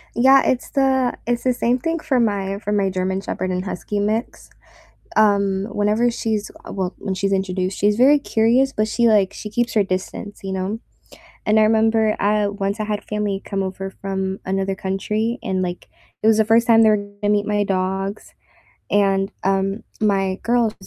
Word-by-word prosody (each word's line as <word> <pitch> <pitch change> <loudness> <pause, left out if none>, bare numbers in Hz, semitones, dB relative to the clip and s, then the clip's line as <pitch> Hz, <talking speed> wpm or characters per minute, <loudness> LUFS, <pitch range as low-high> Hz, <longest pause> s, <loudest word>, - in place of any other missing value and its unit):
Yeah, 265 +3 +6
it's 250 - -1
the 265 -3 +2
it's 240 0 -1
the 255 -1 +2
same 245 +1 0
thing 330 +4 -2
for 265 -4 0
my 200 -3 0
for 210 - -4
my 200 -2 +1
German 190 +1 -2
Shepherd 185 -1 -3
and 185 0 -2
Husky 200 +2 -4
mix, 215 +4 -2 0.7
um, 200 -2 +3
whenever 215 +4 +1
she's 220 -3 -2 0.2
uh, - - -7
well, 185 -2 -3
when 195 -2 -3
she's 195 +1 -1
introduced, 190 -1 -1
she's 205 +1 +2
very 275 +4 +6
curious, 250 +1 +2
but 215 -2 0
she, 235 +2 +1
like 205 -3 +3
she 210 - -7
keeps 240 +3 -1
her 210 -2 +3
distance, 190 +2 -5
you 190 0 -4
know, 190 +4 -3 0.7
and 215 +1 +4
I - - +5
remember, 220 0 +3
uh, 210 0 +2
once 200 +1 -3
I 215 - -2
had 210 -1 -3
family 210 -2 -2
come 195 -1 -2
over 190 0 -5
from 190 0 -2
another 195 0 -1
country 210 +5 -2
and, 190 -1 -1
like, 180 -1 -5 0.3
it - - +1
was 220 -1 +5
the 220 - +4
1st 225 +2 +3
time 225 -1 +6
they 220 - +6
were 210 - +4
gonna 205 0 -3
meet 205 0 +1
my 205 -1 +1
dogs, 195 +1 -3 0.6
and, 195 -1 +2
um, 195 +2 0 0.2
my 195 -3 +1
girl 235 -2 +2
205 Hz, 190 wpm, -21 LUFS, 195-225 Hz, 0.7 s, Yeah